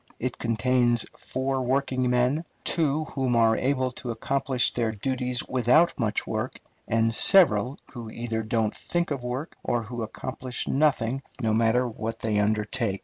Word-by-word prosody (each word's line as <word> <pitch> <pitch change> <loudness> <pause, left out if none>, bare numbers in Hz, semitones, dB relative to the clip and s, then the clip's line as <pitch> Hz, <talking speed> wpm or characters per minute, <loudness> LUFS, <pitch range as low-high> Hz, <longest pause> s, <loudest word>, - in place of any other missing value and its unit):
It 125 0 -3
contains 120 0 +2
four 130 +1 -2
working 130 0 0
men, 125 +6 +2 0.2
two 155 -2 +1
who 130 -5 -1
are 115 -1 +4
able 130 0 0
to 125 0 -8
accomplish 130 +2 0
their 115 -2 0
duties 125 +3 -2
without 130 +8 +3
much 110 -3 0
work, 110 +3 -3 0.3
and 115 0 +2
several 135 - +5 0.2
who 120 -3 -7
either 115 0 -3
don't 110 -1 -1
think 175 -2 -2
of 135 -3 -3
work, 125 +6 -4
or 120 -1 0
who 120 +2 -6
accomplish 125 +3 -5
nothing 135 -3 +1 0.2
no 110 -4 0
matter 115 +3 +2
what 110 0 -5
they 110 -2 0
undertake. 105 0 0
125 Hz, 150 wpm, -26 LUFS, 115-130 Hz, 0.3 s, several